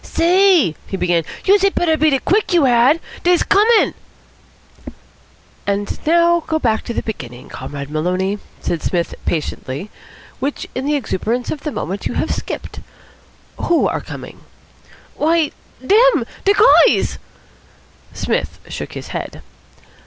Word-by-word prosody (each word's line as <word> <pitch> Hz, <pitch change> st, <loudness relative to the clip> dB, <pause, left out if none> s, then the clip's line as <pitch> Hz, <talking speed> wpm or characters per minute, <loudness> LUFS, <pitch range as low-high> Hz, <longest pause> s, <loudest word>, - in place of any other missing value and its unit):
"Say," 350 Hz, -, +3 dB
he 195 Hz, -, -4 dB
began, 175 Hz, -2 st, +1 dB, 0.2 s
"youse 395 Hz, +1 st, +5 dB
had 395 Hz, 0 st, +2 dB
better 325 Hz, -2 st, +2 dB
beat 310 Hz, -1 st, +2 dB
it 270 Hz, -, -1 dB
quick, 410 Hz, 0 st, +1 dB
you 335 Hz, -5 st, +4 dB
had. 250 Hz, +5 st, +4 dB, 0.2 s
Dey's 355 Hz, 0 st, +3 dB
coming!" 435 Hz, +3 st, +4 dB, 1.7 s
"And 200 Hz, 0 st, -1 dB
now 340 Hz, +1 st, +4 dB
go 315 Hz, -, +1 dB
back 225 Hz, -7 st, 0 dB
to 235 Hz, -, -4 dB
the -, -, -2 dB
beginning, 125 Hz, -, -7 dB
Comrade 140 Hz, 0 st, -7 dB
Maloney," 185 Hz, +6 st, -1 dB, 0.2 s
said 170 Hz, -, -2 dB
Psmith 170 Hz, -3 st, -1 dB
patiently, 155 Hz, +2 st, -3 dB, 0.5 s
"which 280 Hz, +2 st, -3 dB
in 265 Hz, +2 st, -3 dB
the 295 Hz, -, +2 dB
exuberance 240 Hz, -1 st, -2 dB
of 295 Hz, -, -5 dB
the 300 Hz, -, -4 dB
moment 195 Hz, -5 st, -4 dB
you -, -, -5 dB
have -, -, -1 dB
skipped. -, -, -6 dB, 0.8 s
Who 340 Hz, -1 st, +2 dB
are -, -, -2 dB
coming?" -, -, -9 dB, 0.8 s
"Why, 320 Hz, -1 st, +2 dB, 0.3 s
dem. 475 Hz, -, +4 dB, 0.2 s
De 400 Hz, -, +5 dB, 0.3 s
guys." -, -, 0 dB, 0.9 s
Psmith -, -, -2 dB
shook -, -, -6 dB
his -, -, -8 dB
head. -, -, -6 dB
275 Hz, 140 wpm, -18 LUFS, -, 1.7 s, youse